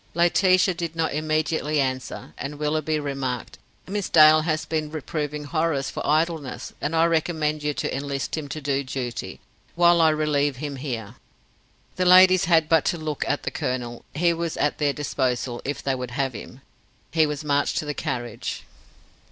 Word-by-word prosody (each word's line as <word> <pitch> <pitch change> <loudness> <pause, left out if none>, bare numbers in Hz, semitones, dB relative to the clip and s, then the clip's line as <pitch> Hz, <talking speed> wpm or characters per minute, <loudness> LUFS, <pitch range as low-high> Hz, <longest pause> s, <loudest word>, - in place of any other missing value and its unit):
Laetitia 185 +2 +4
did 165 -1 -5
not 165 -1 0
immediately 155 0 0
answer, 130 -2 -3
and 145 +1 -6
Willoughby 155 +1 0
remarked: 135 -4 -4 0.3
"Miss 200 +1 -3
Dale 155 -1 +7
has 155 -1 -1
been 155 -2 -2
reproving 150 -1 -4
Horace 155 -2 -1
for - - -5
idleness 155 -2 -1
and 155 +3 -1
I 165 +1 +4
recommend 155 -2 0
you 150 -1 -1
to - - -2
enlist 140 0 -3
him 155 -2 -5
to 155 - -4
do 140 -1 -1
duty, 125 -3 -5 0.4
while 170 0 +5
I 160 - +6
relieve 150 -2 +1
him 140 +1 -5
here." 120 -7 -5 0.8
The 185 - +1
ladies 185 +1 +7
had 165 -3 +4
but 160 -1 +4
to 175 - +1
look 155 -2 -3
at 145 - -1
the - - -3
colonel. 120 -2 -3
He 170 +2 +3
was 170 -1 -3
at 145 - 0
their 145 -2 +2
disposal, 130 -4 -2
if 145 - -4
they 135 - 0
would 125 -1 -4
have 135 -2 0
him. 125 +4 -10 0.5
He 160 -2 +3
was 150 0 -4
marched 145 -1 +1
to - - -1
the 150 - -2
carriage. 120 -4 -4
150 Hz, 175 wpm, -24 LUFS, 140-160 Hz, 0.8 s, Dale